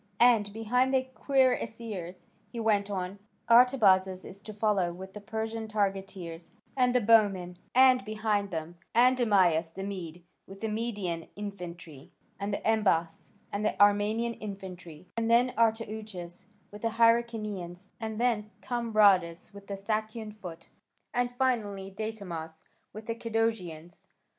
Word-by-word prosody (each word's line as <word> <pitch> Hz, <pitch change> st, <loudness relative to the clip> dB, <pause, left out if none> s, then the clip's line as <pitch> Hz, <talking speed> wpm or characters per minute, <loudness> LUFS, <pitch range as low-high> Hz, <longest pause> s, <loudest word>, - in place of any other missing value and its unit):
And 230 Hz, -4 st, +5 dB
behind 245 Hz, +5 st, +1 dB
the 260 Hz, -, +3 dB
cuirassiers," 230 Hz, -9 st, -1 dB, 0.2 s
he 235 Hz, -, -7 dB
went 205 Hz, -3 st, +1 dB
on, 190 Hz, 0 st, -4 dB, 0.3 s
"Artabazas 205 Hz, -7 st, +5 dB
is 195 Hz, +1 st, -11 dB
to 215 Hz, -, -9 dB
follow 205 Hz, -4 st, +1 dB
with 190 Hz, +2 st, -9 dB
the 210 Hz, -, -8 dB
Persian 220 Hz, +2 st, -4 dB
targeteers 195 Hz, -5 st, -3 dB, 0.2 s
and 250 Hz, -2 st, +2 dB
the 250 Hz, -, +4 dB
bowmen, 200 Hz, -5 st, +3 dB, 0.2 s
and 255 Hz, -2 st, +6 dB
behind 215 Hz, -1 st, -1 dB
them 170 Hz, -1 st, -6 dB, 0.2 s
Andamyas 205 Hz, -10 st, +4 dB
the 190 Hz, -, -5 dB
Mede 175 Hz, -4 st, -6 dB, 0.2 s
with 195 Hz, +1 st, -12 dB
the 220 Hz, -, -1 dB
Median 210 Hz, -7 st, -3 dB
infantry, 180 Hz, -7 st, -8 dB, 0.3 s
and 200 Hz, +1 st, -2 dB
then -, -, -7 dB, 0.2 s
Embas 165 Hz, -4 st, 0 dB, 0.2 s
and 205 Hz, +1 st, -2 dB
the 215 Hz, -, -1 dB
Armenian 205 Hz, +3 st, +3 dB
infantry, 185 Hz, -6 st, -9 dB
and 230 Hz, 0 st, -1 dB
then 245 Hz, +2 st, +4 dB
Artouchas 215 Hz, -6 st, -2 dB, 0.2 s
with 210 Hz, 0 st, -10 dB
the 225 Hz, -1 st, -2 dB
Hyrcanians, 215 Hz, -6 st, +1 dB
and 220 Hz, -1 st, -4 dB
then 230 Hz, -3 st, +1 dB
Thambradas 210 Hz, -8 st, +2 dB
with 200 Hz, -1 st, -12 dB
the 200 Hz, -, -4 dB
Sakian 215 Hz, +2 st, -3 dB
foot, 180 Hz, -6 st, -10 dB, 0.4 s
and 245 Hz, 0 st, 0 dB
finally 215 Hz, -7 st, -1 dB
Datamas 180 Hz, -7 st, -6 dB, 0.3 s
with 215 Hz, +1 st, -9 dB
the 230 Hz, -, -2 dB
Cadousians. 220 Hz, -8 st, -3 dB
210 Hz, 135 wpm, -29 LUFS, 185-225 Hz, 0.4 s, and